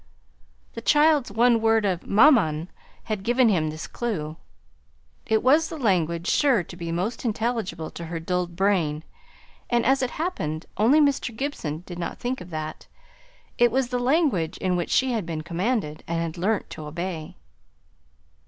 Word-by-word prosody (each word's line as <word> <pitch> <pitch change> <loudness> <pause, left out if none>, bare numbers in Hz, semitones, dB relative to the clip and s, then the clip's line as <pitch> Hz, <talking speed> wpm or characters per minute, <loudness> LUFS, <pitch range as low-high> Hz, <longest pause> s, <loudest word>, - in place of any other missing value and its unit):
The 230 - -6
child's 295 -2 +3
one 230 +2 +3
word 225 -1 +3
of 185 -4 -1
"maman" 200 - +4 0.3
had 215 -3 -3
given 240 +3 +3
him 160 -6 +1
this 155 +1 -6
clue. 160 -11 -4 0.9
It 220 -1 +2
was 300 +6 +4
the 325 - -6
language 170 - +1
sure 265 -10 +3
to 175 - -11
be 170 -1 -5
most 185 +8 -2
intelligible 225 -7 -2
to 170 - -7
her 165 0 -4
dulled 175 +1 -2
brain; 170 -6 +1 0.7
and 240 -1 +2
as 270 +1 +3
it 255 - 0
happened, 160 - -3
only 235 +9 +4
Mr. 275 -6 +1
Gibson 175 - -4
did 175 -1 -8
not 170 - -4
think 250 +2 -3
of 180 - -10
that 155 -1 -6 0.7
it 240 -1 +5
was 260 0 0
the 250 -1 -1
language 250 - +1
in 185 -1 0
which 175 -1 -2
she 260 0 +2
had 225 -4 -1
been 160 -2 -5
commanded, 175 -2 -2
and 165 0 -1
had 165 0 -3
learnt 195 +4 -1
to 155 - -7
obey. 165 0 -5
200 Hz, 165 wpm, -25 LUFS, 165-245 Hz, 0.9 s, it